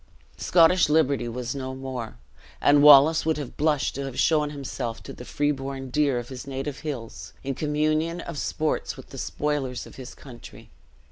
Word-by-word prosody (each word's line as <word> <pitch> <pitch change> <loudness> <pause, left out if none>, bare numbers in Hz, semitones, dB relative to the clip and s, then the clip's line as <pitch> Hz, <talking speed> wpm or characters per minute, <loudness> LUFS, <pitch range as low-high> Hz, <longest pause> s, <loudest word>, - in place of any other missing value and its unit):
Scottish 170 -1 +4
liberty 140 -5 +2
was 120 +1 -4
no 130 -1 -5
more; 130 -4 -6 0.4
and 145 0 +5
Wallace 150 +2 +8
would 160 -1 0
have 145 -4 -6
blushed 150 -2 +1
to 140 0 -4
have 130 -2 -7
shown 150 -2 +3
himself 135 -5 -5
to - - -8
the - - -10
free 145 +3 0
born 135 -1 -6
deer 145 -2 +2
of 120 0 -5
his 130 +1 -8
native 135 +1 -4
hills, 135 -8 -7
in 135 0 -2
communion 155 +4 0
of 165 -5 -6
sports 155 0 -2
with - - -12
the - - -9
spoilers 145 -4 -2
of - - -14
his 130 -1 -9
country. 120 -4 -13
140 Hz, 180 wpm, -25 LUFS, 130-150 Hz, 0.4 s, Wallace